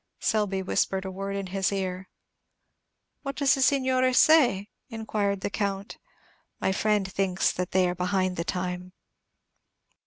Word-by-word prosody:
Selby 205 -3 0
whispered 190 0 0
a 190 - -4
word 195 +1 -4
in 200 -1 -3
his 190 +1 -1
ear. 190 -1 -3 1.1
"What 275 -1 -5
does 280 -2 +3
the 270 - -1
signore 260 -1 +3
say?" 250 -10 +4 0.2
inquired 210 -4 -2
the - - -3
Count. 200 0 -3 0.6
"My - - +1
friend 210 0 +1
thinks 190 -1 0
that 180 0 -3
they 185 -1 +3
are 175 - -1
behind 185 +1 0
the 170 - -2
time." 180 0 -4
195 Hz, 145 wpm, -27 LUFS, 185-215 Hz, 1.1 s, say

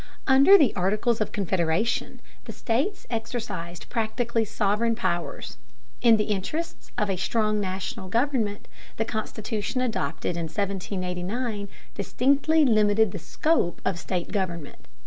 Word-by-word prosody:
Under 275 +9 +8
the 285 - +3
Articles 215 +5 +1
of 215 - 0
Confederation 185 +2 0 0.2
the - - -6
states 270 - -1
exercised 220 -7 -4
practically 230 0 0
sovereign 215 +2 +1
powers; 175 - -3 0.4
in 230 -2 +6
the 210 - +1
interests 215 - -3
of 210 - +1
a 195 -2 -1
strong 215 +2 +1
National 190 0 -4
government 230 -3 0 0.3
the 225 - 0
Constitution 220 +1 -3
adopted 235 -7 -1
in 170 - -2
1789 195 +4 -3 0.2
distinctly 285 +4 +2
limited 215 -3 +4
the - - -5
scope 305 - 0
of 175 - 0
state 180 -1 -3
government. 175 -7 -4
215 Hz, 125 wpm, -26 LUFS, 190-235 Hz, 0.4 s, Under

